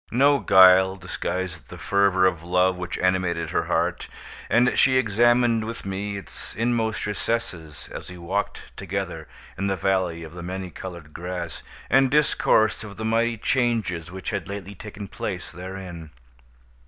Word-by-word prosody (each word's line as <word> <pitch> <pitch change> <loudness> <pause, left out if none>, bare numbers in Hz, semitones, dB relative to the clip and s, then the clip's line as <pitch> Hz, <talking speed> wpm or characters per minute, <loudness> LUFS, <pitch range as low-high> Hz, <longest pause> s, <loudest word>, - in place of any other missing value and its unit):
No 140 +4 +4
guile 95 -1 +7
disguised 90 -2 -4
the - - -9
fervor 100 -2 +3
of 85 -4 +1
love 90 +2 +2
which 90 0 -5
animated 90 -2 0
her - - 0
heart, - - 0 0.4
and 120 +3 +4
she 130 -1 +4
examined 120 0 +3
with 115 0 -6
me 100 +1 -3
its 100 - -10
inmost 115 -1 0
recesses 95 -7 -3
as - - -7
we 90 - -9
walked 95 +4 -4
together 95 -5 -4 0.3
in 100 - 0
the 95 - +1
Valley 90 -2 0
of 80 0 -10
the 90 - -8
Many 90 +1 -5
Colored 85 -5 -9
Grass, 90 -2 -5 0.3
and 135 0 +4
discoursed 120 -7 +3
of 100 -2 -9
the 110 - -4
mighty 115 +1 +1
changes 110 - 0
which 95 0 -5
had 100 -3 -4
lately 100 0 -6
taken 105 0 -8
place - - -5
therein. 90 -2 -8
95 Hz, 155 wpm, -24 LUFS, 90-110 Hz, 0.4 s, guile